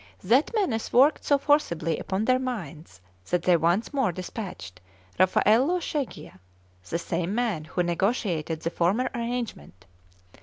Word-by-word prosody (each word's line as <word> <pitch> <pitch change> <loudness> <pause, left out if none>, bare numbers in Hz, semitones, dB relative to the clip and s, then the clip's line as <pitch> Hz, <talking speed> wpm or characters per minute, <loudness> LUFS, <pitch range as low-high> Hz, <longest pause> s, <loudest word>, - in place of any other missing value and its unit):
That 245 +10 +3
menace 265 - -1
worked 275 +5 +4
so 285 - +4
forcibly 170 - +1
upon 195 +3 -2
their 255 +1 +3
minds 170 - -6 0.3
that 180 -1 0
they 180 - +4
once 170 - +1
more 265 -9 +1
despatched 175 - -7 0.4
Raffaello 225 - +3
Schegcia, 290 - -5 0.5
the 170 - -1
same 170 +3 -2
man 220 -10 -1
who 180 +3 -1
negotiated 175 -3 -1
the 165 - -2
former 200 +11 +1
arrangement. 235 - -5
195 Hz, 130 wpm, -26 LUFS, 170-250 Hz, 0.5 s, worked